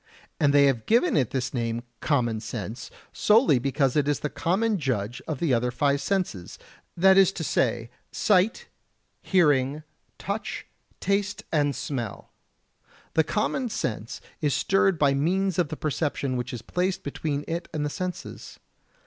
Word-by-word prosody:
And 145 -2 +4
they 140 0 +6
have 130 -5 0
given 240 +10 +3
it 130 -5 +2
this 130 -2 -2
name 115 -1 -2 0.2
"common 120 -7 0
sense" 110 0 -6 0.2
solely 215 - +4
because 135 0 0
it 145 -2 +2
is 145 - 0
the 150 - -2
common 190 +8 0
judge 120 -5 -2
of 155 - -2
the 160 0 0
five 120 - +4 0.3
other 140 - +1
senses, 145 - -2 0.4
that 190 +2 +6
is 195 -1 +5
to 165 - -4
say, 120 -5 0 0.2
sight, 205 +1 +2 0.5
hearing, 150 -5 +2 0.3
touch, 200 +1 -4 0.3
taste 200 +1 -1
and 145 -3 +1
smell. 120 -7 -5 0.8
The 160 - +4
"common 225 - -1
sense" 115 - -4 0.2
is 145 -3 +1
stirred 195 -2 +2
by 145 -2 +3
means 180 +6 +1
of 175 - +2
the 155 - -5
perception 145 -3 -1
which 125 -1 -3
is 120 -2 -6
placed 185 +6 -1
between 145 0 -3
it 170 +1 -3
and 150 -1 -2
the - - -1
senses. 185 +2 -6
145 Hz, 155 wpm, -26 LUFS, 130-185 Hz, 0.8 s, they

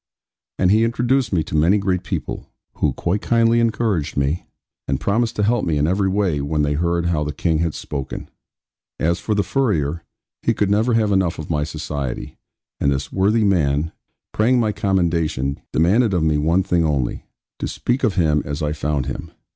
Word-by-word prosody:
And 90 0 +3
he 110 +2 +4
introduced 120 +1 +1
me 85 -5 +1
to 80 - -6
many 85 +7 +4
great 95 -3 0
people, - - -5 0.3
who - - +2
quite 95 +5 -1
kindly 115 0 +3
encouraged 110 -10 0
me, 70 +5 0 0.4
and 70 -1 0
promised 115 - 0
to 105 - 0
help 115 +2 +2
me 80 -3 0
in 75 - +2
every 95 +3 +1
way 95 -7 0
when 75 +1 0
they 75 0 +1
heard 85 +2 0
how 80 -3 +1
the 75 - -2
King 80 +2 0
had 85 -2 -1
spoken. 70 -3 -5 0.7
As 85 +2 +1
for 105 - -1
the 100 - +2
furrier, 85 - 0 0.4
he - - +1
could 100 -1 +1
never 110 +3 +2
have 110 -2 +2
enough 95 -4 +1
of 75 +1 -6
my 75 -2 +1
society; 75 -4 -5 0.4
and 70 - +2
this 70 0 -3
worthy 105 +4 +2
man, 80 -5 +1 0.4
praying 120 +4 +3
my 110 -2 +2
commendation, 85 -9 0
demanded 100 +6 +3
of 85 - +1
me 75 -2 +2
one 85 +5 +2
thing 85 -2 +1
only 70 -6 -1 0.3
to - - -2
speak 125 +3 -2
of 110 -6 +2
him 75 -4 +2
as 75 +2 -4
I 75 0 0
found 75 -3 -1
him. 65 - -5
85 Hz, 190 wpm, -21 LUFS, 75-105 Hz, 0.7 s, he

